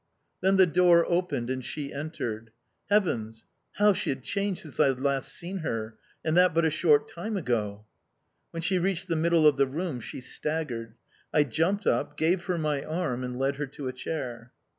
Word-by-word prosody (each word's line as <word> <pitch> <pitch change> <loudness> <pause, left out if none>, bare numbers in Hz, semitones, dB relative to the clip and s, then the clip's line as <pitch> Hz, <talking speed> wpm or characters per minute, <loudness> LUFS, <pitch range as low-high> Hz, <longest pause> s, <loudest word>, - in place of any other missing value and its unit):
Then 190 +1 +3
the 190 - +8
door 175 0 +5
opened, 170 -9 0
and 130 0 -3
she 140 +2 -5
entered. 120 -7 -4 0.4
Heavens! 115 - 0 0.3
How 205 0 +4
she - - -2
had 130 -2 -2
changed 200 +1 -1
since 155 -4 -10
I - - +6
had 135 -2 0
last 140 0 0
seen 185 +2 -4
her 110 -8 -3 0.3
and 160 0 +1
that 180 -2 +5
but 165 0 +3
a 160 - +2
short 150 -2 +3
time 210 +5 -4
ago! 105 - -2 0.6
When 165 0 -5
she 185 +1 +2
reached 185 0 -1
the 165 - +1
middle 165 0 +3
of 150 -2 +6
the 140 0 +3
room, 155 -1 -3
she 115 - -7
staggered. 130 -4 -4 0.4
I 150 - +4
jumped 165 - 0
up, 120 - 0
gave 175 +2 +1
her 180 -1 0
my 150 -3 -1
arm, 155 -6 -2
and 125 0 -4
led 135 +1 0
her 145 0 -2
to 135 0 -7
a 130 - -3
chair. 125 -4 -5
155 Hz, 195 wpm, -28 LUFS, 130-175 Hz, 0.6 s, the